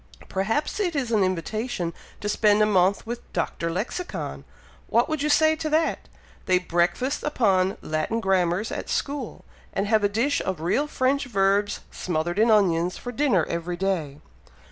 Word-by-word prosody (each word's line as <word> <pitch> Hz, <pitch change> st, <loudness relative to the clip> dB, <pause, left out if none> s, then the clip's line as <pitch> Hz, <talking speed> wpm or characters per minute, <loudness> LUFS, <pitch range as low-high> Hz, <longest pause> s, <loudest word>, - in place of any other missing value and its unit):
"Perhaps 225 Hz, -, -1 dB
it 355 Hz, -6 st, 0 dB
is 255 Hz, -5 st, -1 dB
an 215 Hz, -3 st, +3 dB
invitation 185 Hz, +1 st, -2 dB, 0.3 s
to 210 Hz, -, -3 dB
spend 210 Hz, 0 st, +3 dB
a -, -, +5 dB
month 195 Hz, 0 st, +2 dB
with 235 Hz, +1 st, -4 dB
Dr. 170 Hz, -1 st, -2 dB
Lexicon. 215 Hz, -, -4 dB, 0.4 s
What 235 Hz, -, +3 dB
would 310 Hz, -2 st, -2 dB
you 300 Hz, -, +1 dB
say 315 Hz, +1 st, +4 dB
to 310 Hz, -1 st, -3 dB
that? 315 Hz, +1 st, 0 dB, 0.4 s
They 185 Hz, -, +4 dB
breakfast 180 Hz, -, 0 dB
upon 195 Hz, -9 st, +1 dB
Latin 155 Hz, +9 st, -1 dB
grammars 190 Hz, 0 st, +1 dB
at -, -, -5 dB
school, 280 Hz, -5 st, -3 dB, 0.3 s
and 195 Hz, -, 0 dB
have 215 Hz, 0 st, +2 dB
a 205 Hz, -, +3 dB
dish 235 Hz, +8 st, +1 dB
of 190 Hz, -3 st, -3 dB
real 180 Hz, -, +1 dB
French 275 Hz, 0 st, +1 dB
verbs, 200 Hz, -2 st, +1 dB
smothered 175 Hz, +2 st, -2 dB
in 225 Hz, +2 st, +4 dB
onions, 180 Hz, -5 st, +3 dB
for 245 Hz, -, -6 dB
dinner 245 Hz, -, +2 dB
every 170 Hz, +1 st, -3 dB
day." 170 Hz, -7 st, -1 dB
205 Hz, 165 wpm, -25 LUFS, 180-255 Hz, 0.4 s, a